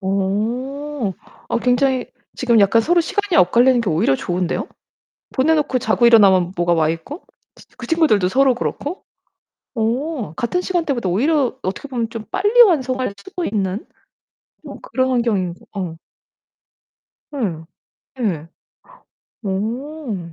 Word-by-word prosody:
오. 225 +6 -2 0.4
아 235 - 0
굉장히 255 +1 +1 0.3
지금 235 -4 +3
약간 220 +3 +4
서로 345 +5 +3
시간이 400 +2 -1
엇갈리는 240 +7 +4
게 205 -7 -1
오히려 145 -4 +2
좋은데요? 180 +2 -2 0.7
보내놓고 295 -1 +2
자고 235 0 +2
일어나면 190 -6 +5
뭐가 175 0 +2
와있고? 165 - -2 0.3
치 - - -18
그 - - -8
친구들도 300 - +3
서로 265 +3 +3
그렇고? 290 +7 -4 0.7
오 235 - -2
같은 245 - -1
시간대보다 315 - -1
오히려 265 - +1
어떻게 195 +9 -4
보면 235 -4 -2
좀 225 -2 -6
빨리 415 +6 +5
완성할 260 - +2
수도 335 - -6
있는 200 0 -2 0.8
어 - - -8
그런 260 - -1
환경인 210 -8 0 0.2
어. 180 -5 -4 1.4
예. 185 - -3 0.6
네. 165 -7 -2 0.9
오 220 - -4
235 Hz, 260 characters per minute, -19 LUFS, 190-285 Hz, 1.4 s, 일어나면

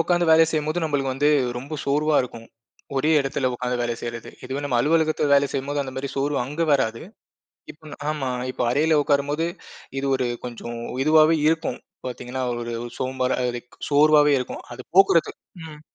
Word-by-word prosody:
உக்காந்து 175 +1 +2
வேலை 160 0 +7
செய்யும்போது 155 +2 -1
நம்பளுக்கு 140 -4 0
வந்து 145 +2 +2 0.3
ரொம்ப 140 +5 -6
சோர்வா 150 +2 +2
இருக்கும். 115 -2 -9 0.5
ஒரே 150 +4 +2
இடத்துல 135 -1 -1
உக்காந்து 125 0 -2
வேலை 120 -1 -1
செய்யிறது. 120 -1 -6
இதுவே 135 +2 -4
நம்ம 130 -4 0
அலுவலகத்துல 155 +1 +2
வேலை 140 0 +4
செய்யும்போது, 140 +2 -2
அந்தமாரி 130 0 -5
சோர்வு 140 +1 0
அங்க 150 +6 -3
வராது. 115 -5 +1 0.7
இப்போ 155 - -15
நா - - -7
ஆமா. 140 -4 -2 0.2
இப்போ - - -3
அறையில 155 +4 +3
உக்காரும்போது 145 +2 +1 0.5
இது 140 - -2
ஒரு 130 - -1 0.2
கொஞ்சம் 120 -1 -6 0.3
இதுவாவே 155 +1 +5
இருக்கும். 160 -5 -1 0.3
பாத்தீங்கன்னா, 125 +1 -5 0.2
ஒரு 120 - -5
இது 120 +1 -5
சோம்பலா 130 0 -1
இருக் 120 0 -9
சோர்வாவே 150 0 +5
இருக்கும். 125 - -5
அது 125 +1 -8
போக்குறதுக் 190 -4 +4 0.3
ம். 150 -1 -12
140 Hz, 160 wpm, -23 LUFS, 125-155 Hz, 0.7 s, வேலை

